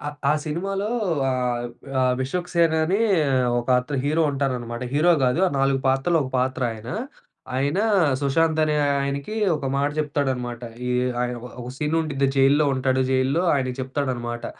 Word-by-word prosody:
ఆ 145 -1 -2
సినిమాలో 195 +6 -2 0.4
ఆహ్, 125 -1 -1 0.3
ఆహ్, 125 -1 +3
'విశ్వక్ 175 +7 -3
సేన్' 165 -2 +3
అని 195 +6 +1 0.6
ఒక 120 - -11
అత 140 +2 -5
హీరో 155 +3 +2
ఉంటారనమాట. 125 -4 -3
హీరో 170 +4 +4
గాదు 125 +8 +2
ఆ - - -7
నాలుగు 135 0 +2
పాత్రలో 135 +6 +2
ఒక 130 - -6
పాత్ర 130 0 -1
ఆయన. 110 +1 -10 0.7
ఆయన 145 +7 0 0.4
సుశాంత్ 160 +3 +1
అనే 150 -1 0 0.3
ఆయనకి 140 +9 -3 0.2
ఒక 140 - -5
మాట 140 +1 +1
చెప్తాడు 145 -2 -1
అన్నమాట. 120 -1 -6 0.3
ఈ - - -1 0.3
ఆహ్, 125 0 -2
ఒక 120 - -9 0.2
ఒక 120 - -7
సీన్ 155 +1 0
ఉండిద్ది 140 -4 0
జైల్‌లో 140 +2 +4
ఉంటాడు 130 0 +1
జైల్‌లో. 135 +6 +1
ఆయనకి 130 -2 -1
చెప్తాడు 130 +1 -2
అన్నమాట. 120 0 -5
140 Hz, 160 wpm, -23 LUFS, 130-155 Hz, 0.7 s, హీరో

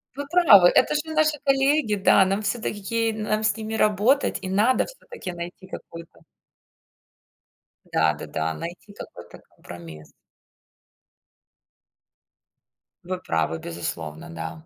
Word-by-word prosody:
Вы 285 +1 -5
правы. 250 - +7
Это 300 - +3
же 300 - +1
наши 310 -1 +2
коллеги, 275 -4 +2
да. 195 0 +4
Нам 195 +2 -1
всё-таки 215 -1 -3
ки 230 +2 -1
нам 215 0 -2
с 215 - +2
ними 220 0 -6
работать. 220 +6 +2
И 185 - -5
надо 215 +7 +2
всё-таки - - -9
найти 175 +2 -8
какой-то 170 -3 -11 1.7
Да, - - +1
да-да. 80 +1 -4
Найти 175 - -9
какой-то - - -12
компромисс. 80 -3 -12 2.9
Вы 185 +1 -3
правы, 80 - -2
безусловно, 80 -2 -6
да. 80 - -8
205 Hz, 115 wpm, -24 LUFS, 165-240 Hz, 2.9 s, правы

